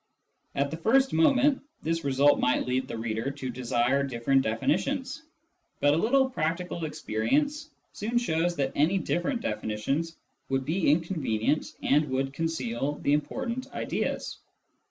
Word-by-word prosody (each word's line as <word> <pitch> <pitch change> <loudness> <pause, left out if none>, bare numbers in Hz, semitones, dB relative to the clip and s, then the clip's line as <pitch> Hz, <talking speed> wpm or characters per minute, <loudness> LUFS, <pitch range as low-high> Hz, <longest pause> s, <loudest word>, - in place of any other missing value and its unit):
At 140 0 0
the 160 - -4
first 265 +9 +3
moment, 265 - +4 0.2
this 165 +1 -1
result 140 +1 +4
might 125 - +2
lead 130 +1 -1
the - - -5
reader 110 +2 -2
to 135 -2 -5
desire 120 +2 +1
different 135 0 +1
definitions, 255 - -1 0.6
but 145 0 +4
a - - +2
little 265 +8 +3
practical 170 -6 -2
experience 220 - -1 0.2
soon 225 +4 -2
shows 175 -6 +1
that 135 -3 0
any 160 +7 +2
different 195 +7 -1
definitions 140 - -2 0.3
would 135 -1 0
be 165 +3 +1
inconvenient 150 - 0
and 150 +1 +3
would 135 +1 -1
conceal 140 -4 -2
the 140 - +3
important 235 - -2
ideas. - - -3
150 Hz, 135 wpm, -28 LUFS, 130-190 Hz, 0.6 s, moment